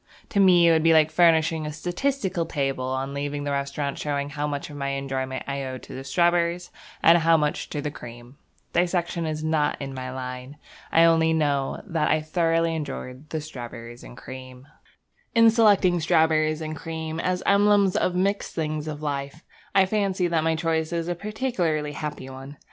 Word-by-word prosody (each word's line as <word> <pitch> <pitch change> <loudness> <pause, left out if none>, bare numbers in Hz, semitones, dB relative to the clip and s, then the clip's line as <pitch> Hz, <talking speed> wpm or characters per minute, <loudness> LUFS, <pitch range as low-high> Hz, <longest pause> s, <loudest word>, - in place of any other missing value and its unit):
To 200 - 0
me 180 -3 +6
it - - +6
would 160 -1 +4
be 165 +1 +5
like 155 -1 +4
furnishing 160 -1 +3
a - - -4
statistical 180 - -2
table 135 -4 -2
on 130 +1 -3
leaving 145 0 -3
the 145 - -2
restaurant 140 0 -2
showing 145 -1 -2
how 145 +1 -2
much 145 +1 -4
of - - -9
my 140 -1 -3
enjoyment 135 -1 -3
I 140 0 -3
owed 130 -1 -6
to - - -10
the 130 - -6
strawberries 175 +3 +1 0.3
and 170 +1 +7
how 165 0 +4
much 150 -1 -1
to 145 - -4
the 150 - -2
cream. 120 0 -11 0.4
Dissection 175 -1 0
is 155 0 -3
not 155 -2 0
in 135 -1 -5
my 130 -1 -5
line. 130 +2 -7 0.3
I 165 - +5
only 165 -1 +4
know 145 -4 0
that 165 -6 0
I 155 - +3
thoroughly 165 +1 +1
enjoyed 140 -2 -6
the 160 - -3
strawberriesandcream. 125 -1 -9 0.7
In 230 0 +7
selecting 200 -6 +4
strawberries 160 -1 +2
and 155 0 -4
cream 160 0 -5
as 180 +1 -1
emblems 200 -1 +4
of 180 - +1
the - - -2
mixed 200 +1 -1
things 155 -1 -2
of 155 0 -6
life, 140 +2 -4 0.3
I 195 -1 +6
fancy 195 -2 0
that 165 -2 +1
my 160 0 +1
choice 160 0 -1
is 170 0 -2
a - - +1
particularly 175 - -2
happy 150 -2 -6
one. 135 +2 -10
155 Hz, 180 wpm, -25 LUFS, 140-170 Hz, 0.7 s, and